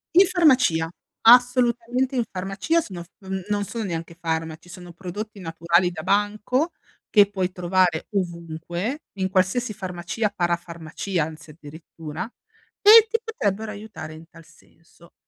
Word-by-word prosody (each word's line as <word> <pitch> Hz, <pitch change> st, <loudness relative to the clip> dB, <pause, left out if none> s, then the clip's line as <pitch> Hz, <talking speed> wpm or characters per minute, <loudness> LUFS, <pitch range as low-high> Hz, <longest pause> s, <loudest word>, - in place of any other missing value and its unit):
In 380 Hz, +3 st, +8 dB
farmacia. 260 Hz, -, +3 dB, 0.3 s
Assolutamente 245 Hz, +1 st, +4 dB
in 245 Hz, -, +2 dB
farmacia, 195 Hz, -, 0 dB
sono 185 Hz, -, -8 dB
f -, -, -20 dB, 0.4 s
non 205 Hz, 0 st, 0 dB
sono 230 Hz, +3 st, -4 dB
neanche 170 Hz, -3 st, -5 dB
farmaci. 160 Hz, 0 st, -3 dB
Sono 175 Hz, -1 st, -11 dB
prodotti 200 Hz, +4 st, -7 dB
naturali 170 Hz, +1 st, +1 dB
da 165 Hz, -2 st, -6 dB
banco, 210 Hz, -, +1 dB, 0.4 s
che 205 Hz, -2 st, +5 dB
puoi 190 Hz, -2 st, -2 dB
trovare 180 Hz, -2 st, +1 dB
ovunque, 175 Hz, -, -3 dB
in 190 Hz, -1 st, -1 dB
qualsiasi 190 Hz, +5 st, +1 dB
farmacia, 190 Hz, +2 st, -3 dB
parafarmacia 170 Hz, 0 st, -2 dB
anzi 155 Hz, 0 st, -10 dB
addirittura, 155 Hz, +1 st, -8 dB, 0.6 s
e 440 Hz, +2 st, +9 dB
ti 455 Hz, +1 st, 0 dB
potrebbero 220 Hz, -, -2 dB
aiutare 205 Hz, -7 st, -8 dB
in 160 Hz, +1 st, -13 dB
tal 165 Hz, -1 st, -16 dB
senso. 165 Hz, +1 st, -22 dB
185 Hz, 130 wpm, -24 LUFS, 170-225 Hz, 0.6 s, e